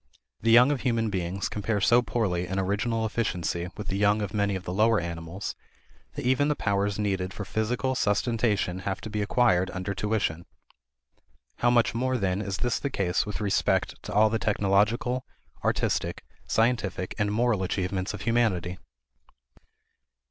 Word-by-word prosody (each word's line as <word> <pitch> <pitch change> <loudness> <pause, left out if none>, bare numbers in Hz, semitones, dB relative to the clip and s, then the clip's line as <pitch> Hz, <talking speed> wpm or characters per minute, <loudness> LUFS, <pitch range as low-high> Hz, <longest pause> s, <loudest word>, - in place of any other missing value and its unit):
The 115 - +1
young 120 +4 +7
of 140 - -1
human 115 -4 0
beings 95 0 -2
compare 105 0 -1
so 120 +5 +5
poorly 95 -8 -1
in 95 +2 -3
original 110 +4 0
efficiency 90 -6 -2
with 105 - -6
the 95 - -1
young 105 +1 +3
of 100 - -5
many 100 -1 +1
of 95 - -5
the 90 - -4
lower 110 +3 +3
animals, 85 +3 -5 0.6
that 145 - -5
even 130 +3 +3
the 150 - +1
powers 100 -3 0
needed 95 -2 -1
for 100 - -5
physical 120 +6 -1
sustentation 105 -4 0
have 95 0 -3
to 110 - -7
be 105 0 -1
acquired 100 -4 +2
under 95 +2 -3
tuition. 100 -5 -1 1.1
How 120 - +3
much 120 -1 +3
more, 130 +2 0
then, 95 -2 0
is 100 -3 -3
this 120 - 0
the 140 - -2
case 95 -5 0
with 105 0 -4
respect 100 -2 0
to - - -7
all 105 +1 +4
the 115 - 0
technological, 105 +5 +1 0.4
artistic, - - 0 0.2
scientific, 110 -6 0
and 105 0 +1
moral 115 -2 +1
achievements 95 0 -2
of 100 - -9
humanity! 100 -7 0
105 Hz, 165 wpm, -27 LUFS, 95-115 Hz, 1.1 s, young